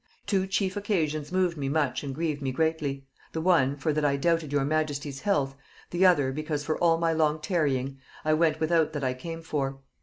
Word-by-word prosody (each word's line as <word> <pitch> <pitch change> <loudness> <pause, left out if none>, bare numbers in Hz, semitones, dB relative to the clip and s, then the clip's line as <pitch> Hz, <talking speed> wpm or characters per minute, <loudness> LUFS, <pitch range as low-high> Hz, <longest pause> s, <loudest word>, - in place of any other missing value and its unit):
Two 195 -2 +1
chief 190 -1 0
occasions 160 -7 -1
moved 180 -2 +1
me 135 -2 -2
much 140 -4 0
and 135 -2 -4
grieved 155 -2 -2
me 135 -1 -1
greatly: 145 -2 -1 0.3
the 160 - -2
one, 160 -6 +3
for 150 +2 0
that 155 0 0
I 140 -1 +2
doubted 165 0 +1
your 145 -2 +1
majesty's 145 -2 -1
health; 145 -9 +1 0.4
the 180 +2 +4
other, 145 -7 +3
because 150 +1 -3
for 155 - 0
all 165 -1 +4
my 165 0 +1
long 155 -1 +2
tarrying, 140 -6 -1 0.3
I 155 - +3
went 155 0 +2
without 160 -1 +2
that 145 -2 -3
I 130 -1 +1
came 165 +5 -7
for. 135 -4 -2
155 Hz, 205 wpm, -27 LUFS, 140-165 Hz, 0.4 s, the